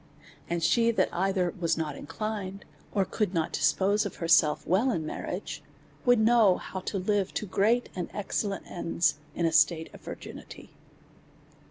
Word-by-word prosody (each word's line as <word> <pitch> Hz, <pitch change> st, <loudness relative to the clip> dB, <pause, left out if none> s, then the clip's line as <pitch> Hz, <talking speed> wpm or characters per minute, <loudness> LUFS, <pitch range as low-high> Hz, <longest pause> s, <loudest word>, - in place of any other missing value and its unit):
And 170 Hz, -1 st, -1 dB
she 230 Hz, +7 st, +4 dB
that 230 Hz, -, +1 dB
either 185 Hz, 0 st, 0 dB
was 165 Hz, -2 st, +1 dB
not 155 Hz, -3 st, -2 dB
inclined^ 200 Hz, +1 st, -5 dB, 0.3 s
or 195 Hz, -2 st, +1 dB
could 205 Hz, -3 st, -2 dB
not 160 Hz, -1 st, 0 dB
dispose 190 Hz, +8 st, +2 dB
of 200 Hz, -, -5 dB
herself 165 Hz, -2 st, +3 dB
well 195 Hz, +10 st, +2 dB
in 165 Hz, -10 st, -1 dB
marriage, -, -, -5 dB, 0.4 s
would 245 Hz, -1 st, +6 dB
know 220 Hz, -3 st, +5 dB
how 190 Hz, -, -6 dB
to 190 Hz, +2 st, -4 dB
live 195 Hz, 0 st, 0 dB
to -, -, -1 dB
great 215 Hz, +5 st, +1 dB
and 180 Hz, -2 st, -4 dB
excellent 200 Hz, 0 st, -3 dB
ends 170 Hz, -2 st, 0 dB, 0.2 s
in 170 Hz, -, 0 dB
a 165 Hz, -, +2 dB
state 160 Hz, +1 st, +3 dB
of -, -, -12 dB
vir -, -, -6 dB
ginity. -, -, -11 dB
190 Hz, 165 wpm, -28 LUFS, 165-210 Hz, 0.4 s, would